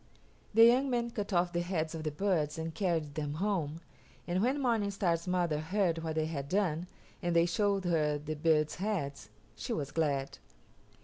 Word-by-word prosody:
The 225 +1 +9
young 255 +4 +4
men 235 -1 0
cut 210 -2 -4
off 175 -1 +2
the 175 - +1
heads 170 -3 -2
of 165 - -4
the 155 - -1
birds 155 -2 0
and 160 0 -4
carried 165 -6 -1
them 150 -1 -3
home, 165 -4 -1 0.4
and 180 +1 0
when 260 +6 +1
Morning 230 -6 +1
Star's 180 -4 0
mother 175 -4 +1
heard 170 +1 0
what 160 -1 -3
they 155 -1 +1
had 140 -3 -4
done, 180 -3 0 0.3
and 175 -2 0
they 170 0 +5
showed 200 +2 +1
her 155 -4 +2
the 150 +1 -5
birds' 155 0 +2
heads, 140 - -3 0.3
she - - -4
was 140 -2 -3
glad. 140 -4 -1
170 Hz, 185 wpm, -32 LUFS, 155-200 Hz, 0.4 s, The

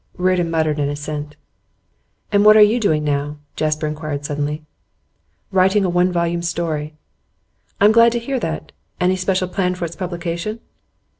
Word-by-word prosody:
Reardon 180 -2 +1
muttered 155 -2 0
an 145 -1 0
assent. 145 0 -5 1.0
'And 205 0 +4
what 215 +1 +8
are - - +7
you 215 +4 +3
doing 155 -9 +1
now?' 145 0 -1 0.2
Jasper 155 0 -1
inquired 150 -1 -4
suddenly. 145 +1 -3 0.9
'Writing 190 +1 +3
a - - +1
one 180 +1 +2
volume 170 -1 0
story.' 160 -3 -3 0.8
'I'm 205 +1 +6
glad 230 +1 +6
to - - 0
hear 260 +3 -3
that. 160 -6 -4 0.3
Any 180 +1 +2
special 185 0 0
plan 180 -1 -1
for 180 - -3
its 170 0 -7
publication? 175 +3 -4
170 Hz, 155 wpm, -20 LUFS, 150-185 Hz, 1.0 s, what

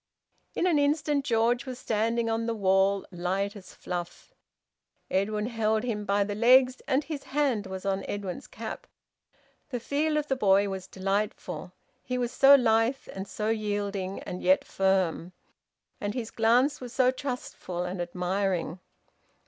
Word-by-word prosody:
In - - +1
an 335 -5 +3
instant 290 0 +1
George 240 0 +1
was 255 -1 -5
standing 230 +1 0
on 225 0 -1
the 230 - -1
wall, 195 -1 +2
light 190 +3 -2
as 195 -2 -12
fluff. 175 -1 -6 0.8
Edwin 210 +2 0
held 220 -2 0
him 215 -4 -2
by 200 0 +2
the 205 +1 -3
legs, 255 +4 +5
and 275 +1 +2
his 295 -2 -6
hand 265 -8 0
was 190 0 -6
on 195 0 0
Edwin's 200 -3 -5
cap. 220 +1 -7 0.8
The 250 -3 -3
feel 300 +5 0
of 300 -1 -1
the 270 - +1
boy 200 -4 +3
was 190 -1 -5
delightful; 195 -1 -3 0.3
he 250 0 -3
was 245 -1 -1
so 275 +2 +8
lithe 230 +1 +2
and 195 +1 -6
so 215 +2 -3
yielding, 205 -3 -2
and 180 - -6
yet 185 +1 +3
firm; 185 -2 0 0.7
and 205 +1 -3
his 235 -3 -4
glance 245 +6 +3
was 245 -2 -7
so 255 -1 +4
trustful 250 -9 -5
and 180 0 -4
admiring. 180 0 -1
215 Hz, 155 wpm, -28 LUFS, 195-250 Hz, 0.8 s, so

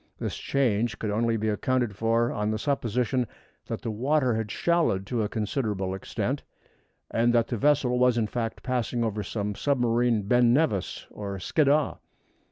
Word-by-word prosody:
This - - -3
change 120 -4 0
could 105 - -2
only 115 +2 +1
be 110 0 -2
accounted 120 0 0
for 115 +2 +1
on 105 0 -1
the 110 - 0
supposition 125 -1 0 0.4
that - - -5
the 115 - -2
water 130 +3 +1
had 110 -1 -2
shallowed 160 - +1
to 115 +3 -1
a 105 - -1
considerable 105 -4 -2
extent, 95 - -3 0.7
and 115 +1 +3
that 115 -1 +2
the 120 - -1
vessel 135 -3 +3
was 125 -1 +4
in 115 - +2
fact 115 +1 -4
passing 125 -1 -1
over 110 -2 -1
some 105 +1 -3
submarine 120 -3 +1
Ben 120 +3 +4
Nevis 130 - 0
or 100 -1 -5
Skiddaw. 145 - +2
115 Hz, 165 wpm, -27 LUFS, 105-125 Hz, 0.7 s, was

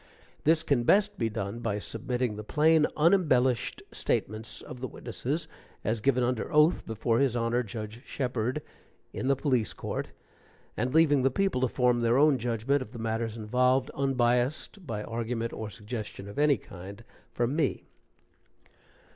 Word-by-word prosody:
This 160 +1 +4
can 140 -4 +2
best 205 - +3
be 115 - +1
done 100 +1 -4
by 110 -3 -1
submitting 120 +2 -2
the 105 - -6
plain, 155 +6 +4
unembellished 150 -8 +3
statements 110 +3 -3
of 125 - -9
the 130 - -3
witnesses 140 +7 -4 0.4
as 110 0 -1
given 130 0 +2
under 120 -2 -1
oath 150 +3 +4
before 115 +1 0
his 135 -4 +2
Honor 120 +1 +1
Judge 110 +1 -7
Sheperd, 125 +1 -2 0.5
in 130 - -3
the 135 - +4
Police 130 -5 0
Court, - - -4 0.7
and 125 +4 -1
leaving 150 -2 +4
the 135 - +3
people 190 -1 0
to 130 - +3
form 125 -1 +2
their 120 +1 +3
own 145 -2 +5
judgment 120 +4 0
of 125 -2 -8
the - - -7
matters 115 0 -2
involved, 125 +4 +2
unbiased 135 - 0
by 105 -3 -3
argument 115 +1 -3
or 110 -1 -5
suggestion 105 -1 -7
of 100 - -6
any 145 -2 +4
kind 100 +4 -11 0.3
from 120 +4 -1
me. 155 -4 0
125 Hz, 155 wpm, -29 LUFS, 115-140 Hz, 0.7 s, own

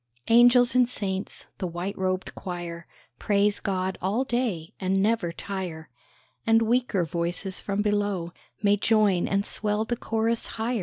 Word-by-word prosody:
Angels 240 +1 +6
and 250 -1 +4
saints, 195 -5 -4
the 185 - -2
white 175 +4 -4
robed 185 0 -2
choir, 175 -2 -6 0.3
Praise 205 0 +2
God 190 -1 -2
all 205 +8 +1
day, 235 -11 -2
and 190 0 +1
never 205 -4 +1
tire, 170 -6 -6 0.5
And 225 0 +4
weaker 230 -6 +1
voices 175 +4 -3
from 200 0 -1
below 205 -5 0 0.3
May 205 0 +4
join 205 -4 +3
and 200 +1 0
swell 210 +1 -1
the 240 - -1
chorus 225 0 -1
higher. 230 +1 -1
200 Hz, 145 wpm, -26 LUFS, 185-225 Hz, 0.5 s, Angels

